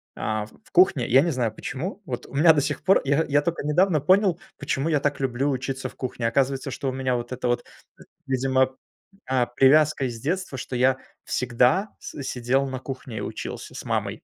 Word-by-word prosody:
а, 110 -1 -2
в 110 - -20
в - - -23
кухне. 175 -9 +4
Я 130 +3 +6
не 170 - +1
знаю, 120 -5 -1
почему, 170 - -5
вот, 125 -6 -5
у - - -15
меня 160 +4 +6
до 145 - +2
сих 145 +1 -3
пор, 190 +2 +5
я, 145 +4 +2
я 145 +1 +4
тока 170 -3 -2
недавно 155 +1 +2
понял, 185 +3 +3 0.2
почему 145 +2 -1
я 150 - +2
так 145 0 -1
люблю 135 +1 0
учиться 135 0 -3
в - - -13
кухне. 125 -2 -3
Оказывается, 135 +2 0
что 135 +2 -3
у - - -1
меня, 130 -1 -1
вот 120 +1 -4
это 125 0 -2
вот, 120 0 0 0.6
видимо, 130 0 +1 0.5
а, 130 -2 +2
привязка 140 +3 +4
из 120 -3 -4
детства, 175 -2 -2
что 125 - -5
я 130 +1 +3 0.3
всегда 125 - +2
с 145 - -8
сидел 130 +2 0
на 130 -1 -4
кухне 130 -4 -7
и - - -4
учился - - -6
с - - -7
мамой. - - -2
135 Hz, 205 wpm, -24 LUFS, 125-150 Hz, 0.6 s, Я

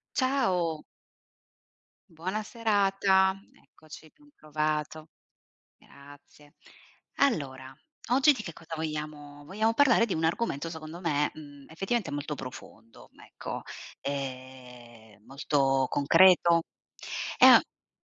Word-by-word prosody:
Ciao. 185 - 0 1.3
Buona 185 +6 -4
serata. 195 -4 +2
Eccoci, 155 0 -16
ben 295 -1 -23
trovato. 155 +1 -3 0.7
Grazie. 145 +1 -18 0.6
Allora 135 - -1 0.4
oggi 275 +4 +5
di 255 -7 -4
che 170 - -7
cosa 165 +1 -9
vogliamo 150 -2 -6
vogliamo 215 +8 0
parlare 240 -3 +4
di 215 - -3
un 160 - -2
argomento 165 -2 -1
secondo 160 +1 -9
me, 150 -4 0
mhmm, 145 -2 -13
effettivamente 195 +4 -2
molto 145 +1 -4
profondo, 115 -3 -12 0.2
ecco, - - -7 0.4
ehm, 125 -5 -8
molto 135 0 0
concreto. 170 +3 +5 0.8
E - - +8
a - - +10
e - - -17
155 Hz, 105 wpm, -28 LUFS, 140-190 Hz, 1.3 s, a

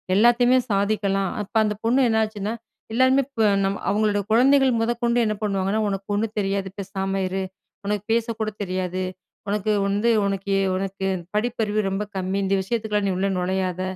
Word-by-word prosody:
எல்லாத்தையுமே 240 +4 +5
சாதிக்கலாம். 200 -1 +1
அப்ப 205 - -16
அந்த 210 -1 -1
பொண்ணு 250 +4 +3
என்னாச்சுன்னா, 215 -1 0 0.4
எல்லாருமே 260 +3 +4
இப்ப 240 -5 -1 0.2
நம்ம 195 0 -2
அவங்களோட 205 0 +1
குழந்தைகள் 265 +1 +4
முதற்கொண்டு, 235 +1 +1
என்ன 215 -1 0
பண்ணுவாங்கன்னா, 195 0 0
ஒனக்கு 195 0 -4
ஒண்ணும் 215 +1 -2
தெரியாது 195 -1 -1
பேசாம 195 0 -2
இரு. 190 +1 -2 0.4
உனக்கு 205 -1 -1
பேசக்கூட 225 -1 -1
தெரியாது. 185 -1 -2 0.5
உனக்கு 210 +1 0 0.2
வந்து 205 +4 +1 0.2
உனக்கு 195 0 -1 0.2
உனக்கு 195 0 -3 0.3
படிப்பறிவு 215 -1 0
ரொம்ப 195 +2 -2
கம்மி. 190 +1 -1
இந்த 195 +1 +2
விஷயத்துக்குலாம் 210 -1 -1
நீ 190 - 0
உள்ள 195 +1 +1
நுழையாத 185 0 -1
205 Hz, 145 wpm, -23 LUFS, 195-225 Hz, 0.5 s, எல்லாத்தையுமே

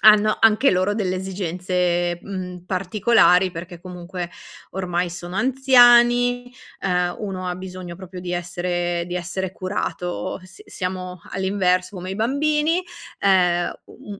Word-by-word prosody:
hanno 215 0 +7
anche 225 +5 +5
loro 185 +3 +1
delle 190 -4 -1
esigenze, 180 -2 -1
mhmm, 180 -2 -7
particolari 190 0 +3
perché 170 +1 -8
comunque 180 0 -6 0.4
ormai 180 -1 -1
sono 175 +1 -7
anziani, 245 -1 +5 0.3
ehm, 180 -2 0
1 190 -3 -4
ha 180 - -2
bisogno 185 -1 -8
proprio 185 0 -10
di 180 0 -5
essere 175 0 -2
di 175 - -5
essere 180 +1 -3
curato, 185 -1 -3
s 185 - -14
siamo 185 -1 -5
all'inverso 190 -1 0
come 185 0 -6
i 195 - -4
bambini, 300 - +1 0.4
ehm, 180 -3 +3
u 205 - -12
185 Hz, 125 wpm, -22 LUFS, 180-205 Hz, 0.4 s, hanno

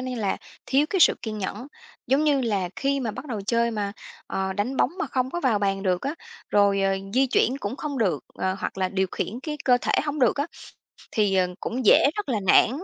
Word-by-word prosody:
nó - - -5
như - - -3
là, 205 -4 -1 0.3
thiếu 275 +3 +3
cái 385 - 0
sự - - +7
kiên 220 -2 -4
nhẫn. 210 +5 -4 0.4
Giống 270 +5 +2
như 285 -3 +3
là 200 -7 0
khi 275 0 0
mà 235 -4 -2
bắt 240 - -8
đầu 225 -7 -4
chơi 235 0 +2
mà, 205 -3 -3 0.3
ờ, 190 0 -2
đánh 210 +7 -2
bóng 260 - +3
mà - - -1
không 255 0 -1
có 345 - -3
vào 235 -8 +2
bàn 195 -1 0
được 180 -2 0
á, 280 +3 -2 0.4
rồi, 200 -1 +3
ờ, 195 0 +2 0.2
di 265 +2 +4
chuyển 255 +1 +2
cũng 210 +5 -4
không 285 0 -4
được, 180 - 0
ờ, 185 0 -1
hoặc 190 - -4
là, 185 - +1
điều 190 0 0
khiển 240 +5 -3
cái 300 0 -4
cơ 250 -1 +5
thể - - -1
hông 295 0 -3
được 250 -3 +3
á, 285 +2 0 0.7
thì, 205 -3 +2
ờ, 185 -1 +3
cũng 250 +1 -3
dễ 280 - +7
rất 415 -5 -3
là 225 -6 0
nản - - +6
235 Hz, 245 wpm, -25 LUFS, 200-270 Hz, 0.7 s, sự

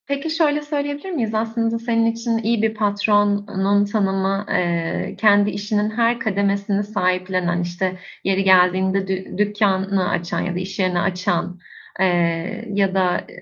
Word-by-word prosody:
Peki 280 +3 -2
şöyle 310 -2 +1
söyleyebilir 290 +2 -4
miyiz? 235 -10 -2
Aslında 225 +1 -1
senin 230 -1 +1
için 230 0 0
iyi 225 0 0
bir 220 0 +1
patronun 205 -1 +1
tanımı, 195 -1 0
eee, 170 +2 -1
kendi 205 -1 +5
işinin 210 +1 -1
her 235 +2 +1
kademesini 200 -1 0
sahiplenen, 185 -3 -1
işte 180 +1 -3 0.2
yeri 195 0 +1
geldiğinde 190 +1 +3
dü 190 -1 -4
dükkânını 200 -2 +1
açan 170 0 -2
ya 185 - -3
da - - -1
iş 190 +2 -6
yerini 185 -2 +1
açan, 180 -1 -1 0.4
eee, 175 +4 0
ya 195 -1 +1
da 185 -2 +1
200 Hz, 140 wpm, -21 LUFS, 185-220 Hz, 0.4 s, kendi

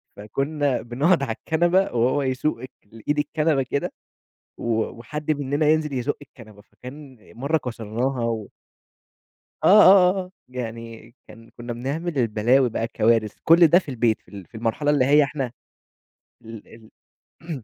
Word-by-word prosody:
فكُنا 135 +6 -2
بنقعُد 140 +7 +1
على 115 - -2
الكنبة 175 +3 +2
وهو 125 +4 +1
يسوق 130 0 -2
اك 130 - -9
الإيد 115 +8 -4
الكنبة 150 -2 0
كده 140 +2 -3 0.7
و 120 - -3
وحد 150 +8 -6
مننا 145 +1 0
ينزل 155 -1 +1
يزُق 130 +2 -2
الكنبة 110 -7 -16
فكان 130 +2 -13 0.2
مرّة 140 +6 -1
كسرناها 120 0 -3
و 115 -3 -3 1.2
آه، - - +4 0.2
آه، 185 -1 +7
آه 185 0 -7 0.2
يعني 115 -2 -8
كان 115 +1 -15
كُنا 120 0 -6
بنعمل 145 +7 -4
البلاوي 120 +2 +2
بقى 115 - -3
الكوارث 115 -2 +1
كل 165 +1 +6
ده 170 +4 +5
في 165 - -11
البيت 120 -3 0
في - - -41
ال 100 -3 -10
في 100 - -20
المرحلة 115 +6 -1
اللي 135 -3 +2
هي 145 +2 +5
إحنا 135 -3 -4 0.9
ال 115 -2 -11 0.8
ال 155 -8 -6
130 Hz, 145 wpm, -23 LUFS, 115-150 Hz, 1.2 s, آه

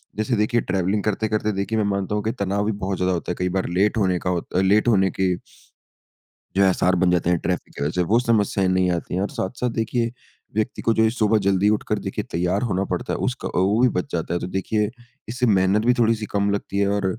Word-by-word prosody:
जैसे 110 +4 0
देखिए 110 +3 +2
ट्रैवलिंग 95 +2 -1
करते-करते 110 0 0
देखिए 100 +3 -2
मैं 110 - +1
मानता 100 0 -1
हूँ 105 - -1
कि, 110 - 0
तनाव 100 0 -1
भी 110 - +1
बहुत 95 -1 -2
ज़्यादा 90 0 +1
होता 90 0 -3
है - - -3
कई 90 0 0
बार - - -2
लेट 100 +5 +1
होने 95 -4 +2
का 90 - -3
होत 90 -2 -2
लेट 100 +4 +3
होने 95 -5 +4
के 95 -1 +2 1.2
जो 100 - +5
है - - +5
आसार 90 0 +2
बन 90 0 +2
जाते 90 -1 +1
हैं 90 - +3
ट्रैफ़िक 90 +2 -3
की - - -5
वज़ह 75 - 0
से, 90 - 0
वो 110 +7 +3
समस्याएँ 105 -5 +1
नहीं 95 -1 +2
आती 85 0 -3
है। 95 - 0
और 100 - -1
साथ-साथ 125 +6 -2
देखिए 115 +1 0 0.4
व्यक्ति 110 +3 -1
को 115 - +2
जो 110 - +3
ये 110 - +4
सुबह 110 -2 +2
जल्दी 100 +1 +3
उठकर 105 0 0
देखिए - - -4
तैयार 90 +4 0
होना 95 -5 0
पड़ता - - -2
है - - -1
उसका - - -3
वो 100 +5 +2
भी 130 - +6
बच 90 - -3
जाता 85 0 -2
है, 85 - 0
तो - - -4
देखिए 105 +3 -1 0.4
इससे 125 +2 -1
मेहनत 100 0 +3
भी 125 - +5
थोड़ी-सी 115 -2 +2
कम 100 0 +1
लगती 100 -1 -3
है 100 - +2
और 100 -1 0
100 Hz, 245 wpm, -22 LUFS, 95-110 Hz, 1.2 s, भी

